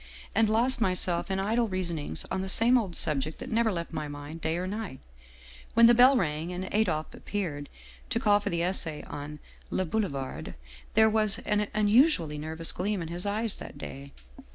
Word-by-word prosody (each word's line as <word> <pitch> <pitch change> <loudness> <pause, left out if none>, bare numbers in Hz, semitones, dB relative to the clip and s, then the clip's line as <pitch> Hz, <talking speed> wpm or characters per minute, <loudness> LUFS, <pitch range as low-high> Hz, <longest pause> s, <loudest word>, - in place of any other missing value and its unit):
and 220 -1 +3
lost 240 +4 +2
myself 180 -3 0
in 190 0 -1
idle 225 +4 +1
reasonings 170 - -3
on 190 - -1
the 190 - -4
safne 230 +6 +7
old 205 -8 0
subject 155 0 +2
that - - -8
never 225 0 +2
left 170 -2 -5
my 155 -2 -4
mind 145 +3 -8
day 160 +1 -1
or 180 - -3
night, 200 - -5 0.8
when 230 +1 +7
the 235 - +7
bell 255 +3 +6
rang 160 -3 -2
and 180 +1 -4
Adolphe 175 -8 0
appeared, 155 -8 -5 0.4
to 230 - 0
call 205 -2 +3
for 205 - -3
the 170 0 -1
essay 170 -4 0
on 145 +1 -8 0.2
' - - -26
Le 185 - -1
Boulevarde.' 155 -9 -4 0.4
There 220 0 +6
was 215 -1 +2
an 210 0 0
unusually 210 - +3
nervous 160 +2 -2
gleam 200 +2 -2
in 165 - -7
his 175 +3 -4
eyes 215 +1 -1
that - - -10
day. 140 +1 -9
185 Hz, 190 wpm, -28 LUFS, 160-220 Hz, 0.8 s, safne